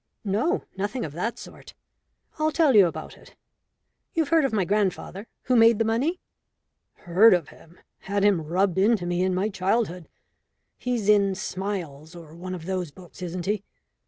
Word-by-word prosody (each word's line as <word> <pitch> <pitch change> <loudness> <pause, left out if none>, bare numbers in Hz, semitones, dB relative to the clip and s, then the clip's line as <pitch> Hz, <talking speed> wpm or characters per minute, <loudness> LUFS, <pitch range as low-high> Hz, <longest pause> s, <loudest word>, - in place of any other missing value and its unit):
"No, 225 - 0
nothing 205 +6 -3
of 145 - -7
that 215 +9 -3
sort. - - -12 0.6
I'll 310 0 +2
tell 300 -5 +3
you 200 -4 +7
about 165 - -8
it. - - -18 0.8
You've 320 -4 +1
heard 325 -3 +4
of 270 - 0
my 205 -4 +1
grandfather 200 +1 -1 0.2
who 255 - +1
made 230 -1 +6
the 225 - +1
money?" 265 +11 0 0.9
"Heard 185 +4 +6
of 170 -5 -3
him? 170 +2 -18 0.2
Had 200 0 -2
him 200 -5 +3
rubbed 180 +4 0
into 205 -2 +3
me 175 0 -1
in 185 0 +1
my 195 +4 0
childhood. 190 -3 -1 0.7
He's 245 -5 -2
in 200 -2 +4
Smiles 180 -5 -5
or 165 -3 -12
one 185 +2 -6
of 165 -3 -9
those 185 -2 -2
books, 175 +4 -15
isn't 180 0 -4
he? 205 0 -1
195 Hz, 170 wpm, -25 LUFS, 180-225 Hz, 0.9 s, you